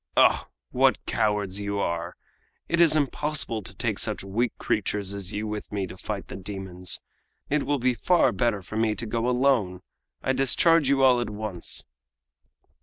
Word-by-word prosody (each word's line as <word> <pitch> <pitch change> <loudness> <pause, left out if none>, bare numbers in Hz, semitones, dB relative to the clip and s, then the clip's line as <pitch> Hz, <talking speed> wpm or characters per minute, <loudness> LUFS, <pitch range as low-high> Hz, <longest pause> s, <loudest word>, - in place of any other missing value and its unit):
Oh! - - +4 0.2
what - - +2
cowards 105 -2 0
you 100 0 -3
are! 85 -2 -2 0.5
It 170 - 0
is 165 -2 +6
impossible 145 -5 +1
to 90 - -7
take - - -1
such - - 0
weak 110 +5 -1
creatures 100 -1 -1
as 100 -1 -4
you 105 +1 -3
with 105 -1 -5
me 100 -2 -2
to - - -9
fight - - -6
the - - -8
demons. 95 -2 -3 0.5
It 150 0 +1
will 145 0 +1
be 125 0 +1
far 175 +8 +3
better 115 -6 0
for 110 +5 -7
me 110 -1 +1
to 115 - -4
go 115 +2 -1
alone. 125 -8 +1 0.4
I 130 - +1
discharge 135 +3 +3
you 135 -1 +3
all 125 -2 +5
at 120 - -3
once!" 105 -4 0
110 Hz, 175 wpm, -26 LUFS, 100-130 Hz, 0.5 s, is